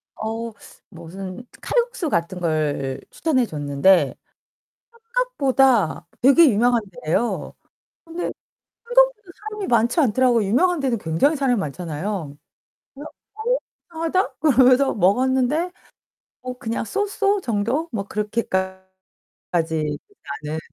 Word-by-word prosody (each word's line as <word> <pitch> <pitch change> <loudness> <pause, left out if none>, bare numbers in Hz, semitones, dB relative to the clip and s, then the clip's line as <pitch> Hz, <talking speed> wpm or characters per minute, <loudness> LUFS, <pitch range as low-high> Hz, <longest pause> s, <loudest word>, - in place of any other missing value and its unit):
어 225 +1 -4 0.4
무슨 185 +6 -9 0.2
칼국수 475 -9 -1
같은 170 0 -1
걸 150 -5 -1
추천해 265 -7 +1
줬는데 150 +3 +2 1.0
생각보다 265 - +2
되게 275 +4 +7
유명한 235 +2 +3 0.2
데예요. 200 +10 -1 0.5
근데 335 +2 -4 0.6
생각보다 485 -5 +3 0.2
사람이 420 -2 -5
많지 235 +6 +3
않더라고요. 240 -4 +3
유명한 340 - +2
데는 250 -5 0
굉장히 195 - +1
사람이 260 -4 +1
많잖아요. 165 -1 -4 0.6
그래서 290 +3 -9 0.2
'어 470 +3 0 0.3
이상하다?' 330 +4 -1
그러면서 265 -2 +4
먹었는데 260 - +2 0.7
뭐 250 0 -6
그냥 230 -3 -3
So 410 - 0
So 405 0 +1
정도 240 - -1
뭐 200 -3 -3
그렇게까지 190 -3 -2 0.7
나는 160 - -3
240 Hz, 265 characters per minute, -22 LUFS, -, 1.0 s, 되게